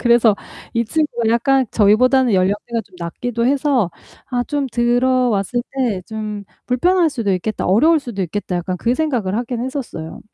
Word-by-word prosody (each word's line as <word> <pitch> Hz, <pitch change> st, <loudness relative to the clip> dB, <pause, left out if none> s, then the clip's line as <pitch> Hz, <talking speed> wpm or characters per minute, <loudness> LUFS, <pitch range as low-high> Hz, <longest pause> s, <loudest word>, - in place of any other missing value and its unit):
그래서 235 Hz, -3 st, +4 dB, 0.4 s
이 235 Hz, -, +1 dB
친구가 240 Hz, -3 st, 0 dB
약간 265 Hz, +3 st, +2 dB
저희보다는 240 Hz, +3 st, +4 dB
연령대가 205 Hz, +5 st, 0 dB
좀 190 Hz, -, -24 dB
낮기도 235 Hz, +8 st, -2 dB
해서 270 Hz, -, +2 dB, 0.4 s
아 245 Hz, -1 st, 0 dB
좀 285 Hz, 0 st, -2 dB
들어왔을 240 Hz, -2 st, +1 dB
때 240 Hz, -9 st, -1 dB
'좀 215 Hz, -2 st, -5 dB, 0.2 s
불편할 345 Hz, +8 st, +3 dB
수도 230 Hz, -9 st, -1 dB
있겠다. 195 Hz, +4 st, -2 dB
어려울 305 Hz, -, +4 dB
수도 235 Hz, -7 st, -6 dB
있겠다.' 180 Hz, +1 st, -3 dB
약간 180 Hz, +1 st, -3 dB
그 235 Hz, +6 st, 0 dB
생각을 250 Hz, -11 st, -1 dB
하기는 240 Hz, 0 st, -3 dB
했었어요. 255 Hz, -, -6 dB
235 Hz, 355 characters per minute, -19 LUFS, 205-260 Hz, 0.4 s, 그래서